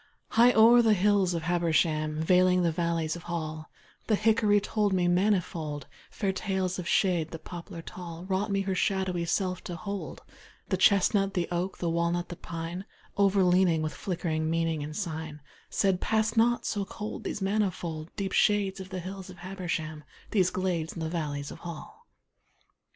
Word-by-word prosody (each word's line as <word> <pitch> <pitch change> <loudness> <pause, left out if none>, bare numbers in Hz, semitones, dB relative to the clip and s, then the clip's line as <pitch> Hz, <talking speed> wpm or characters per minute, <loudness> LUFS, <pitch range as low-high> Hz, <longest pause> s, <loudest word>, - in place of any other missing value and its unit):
High 240 +2 +6
o'er 230 +2 +7
the 220 -2 +4
hills 195 -2 +3
of 165 - -3
Habersham, 160 -2 +1
Veiling 180 +1 +4
the 170 - +2
valleys 165 -1 -1
of 170 - -8
Hall, 155 -2 -4 0.4
The 220 - +3
hickory 215 -1 +3
told 205 0 0
me 180 -1 +2
manifold 175 -5 0 0.2
Fair 195 -3 -1
tales 190 -2 -2
of 175 - -5
shade, 175 -6 +2
the 165 - -6
poplar 170 +1 -9
tall 170 -1 -8
Wrought 195 +2 -1
me 195 0 +1
her 195 -1 -1
shadowy 185 -2 0
self 185 +1 -1
to 175 - -5
hold, 200 +3 -6 0.5
The 190 - +1
chestnut, 195 +1 +3
the 175 -2 0
oak, 175 +2 -2
the 175 - -2
walnut, 170 +1 0
the 175 - -6
pine, 170 +3 -6 0.3
Overleaning, 185 -4 +3
with 155 - -2
flickering 165 -5 -2
meaning 165 -1 0
and 150 +1 -6
sign, 160 -5 -4 0.3
Said, 190 -2 +1
`Pass 220 +1 +1
not, 235 +1 +3
so 205 -2 -1
cold, 210 +2 -6
these - - -3
manifold 185 -6 -1
Deep 195 -1 -3
shades 200 -2 +2
of 190 0 -8
the 185 -1 -4
hills 190 +1 -7
of 185 - -11
Habersham, 175 -5 -4 0.3
These 185 -4 +3
glades 180 -4 -2
in - - -7
the 160 -1 -2
valleys 145 -4 -3
of - - -10
Hall.' 175 - -9
180 Hz, 170 wpm, -28 LUFS, 165-195 Hz, 0.5 s, o'er